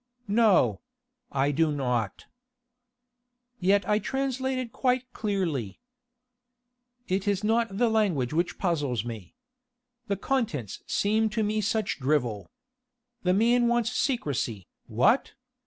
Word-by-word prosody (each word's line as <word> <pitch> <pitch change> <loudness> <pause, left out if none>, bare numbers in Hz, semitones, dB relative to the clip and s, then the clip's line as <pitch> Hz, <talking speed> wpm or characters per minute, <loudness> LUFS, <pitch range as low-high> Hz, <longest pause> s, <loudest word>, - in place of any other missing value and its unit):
"No. 215 -1 +3 0.5
I 140 +1 +1
do 155 +2 +2
not." 125 -7 -2 1.3
"Yet 195 +2 +2
I 210 0 +3
translated 260 -1 -2
quite 255 0 0
clearly." 175 - -2 1.3
"It 190 +2 -1
is 200 0 +1
not 225 -2 +1
the 240 +2 +3
language 200 - +1
that 170 +3 -1
puzzles 145 - -1
me. 110 -6 -8 0.7
The 200 - -1
contents 200 - -2
seem 215 +2 +1
to 215 +1 -1
me 215 +1 0
such 220 -3 -1
drivel. 125 - 0 0.7
The 180 0 +2
man 240 +3 +3
wants 240 -1 +1
secrecy, 140 - -1 0.2
what? - - +2
200 Hz, 110 wpm, -27 LUFS, 145-230 Hz, 1.3 s, No